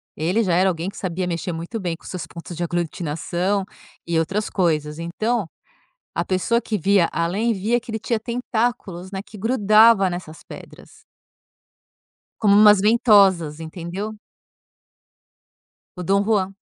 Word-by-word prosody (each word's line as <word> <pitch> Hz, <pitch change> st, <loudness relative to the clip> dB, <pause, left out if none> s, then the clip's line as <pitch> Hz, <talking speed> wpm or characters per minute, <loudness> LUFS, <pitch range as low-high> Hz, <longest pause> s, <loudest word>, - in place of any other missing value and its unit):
ele 180 Hz, +9 st, 0 dB
já 180 Hz, -, 0 dB
era 190 Hz, +2 st, +4 dB
alguém 170 Hz, +1 st, -3 dB
que 200 Hz, -, -12 dB
sabia 180 Hz, -1 st, -3 dB
mexer 175 Hz, +1 st, -3 dB
muito 170 Hz, +8 st, -5 dB
bem 175 Hz, -4 st, -3 dB
com -, -, -21 dB
seus 180 Hz, -3 st, -6 dB
pontos 170 Hz, +1 st, -9 dB
de 175 Hz, -, -2 dB
aglutinação 175 Hz, +3 st, -2 dB, 0.4 s
e 170 Hz, -1 st, 0 dB
outras 195 Hz, +6 st, -1 dB
coisas, 155 Hz, -4 st, -1 dB
então 210 Hz, +4 st, -2 dB, 0.7 s
a -, -, -1 dB
pessoa 195 Hz, +6 st, +1 dB
que 215 Hz, -2 st, -2 dB
via 195 Hz, 0 st, +3 dB
além 185 Hz, +8 st, 0 dB
via 220 Hz, +4 st, 0 dB
que 240 Hz, 0 st, -10 dB
ele 220 Hz, -, -3 dB
tinha 225 Hz, 0 st, -2 dB
tentáculos 230 Hz, -6 st, -3 dB
né, 190 Hz, -1 st, -4 dB
que 215 Hz, -, -12 dB
grudava 215 Hz, -2 st, +4 dB
nessas 175 Hz, -3 st, -7 dB
pedras -, -, -13 dB, 1.4 s
como 205 Hz, -2 st, +4 dB
umas 210 Hz, -1 st, +7 dB
ventosas 195 Hz, -8 st, +4 dB
entendeu? 175 Hz, +6 st, -6 dB, 1.8 s
O 180 Hz, -, -5 dB
Dom 195 Hz, +3 st, +2 dB
Juan. 195 Hz, -3 st, 0 dB
190 Hz, 145 wpm, -22 LUFS, 170-215 Hz, 1.8 s, umas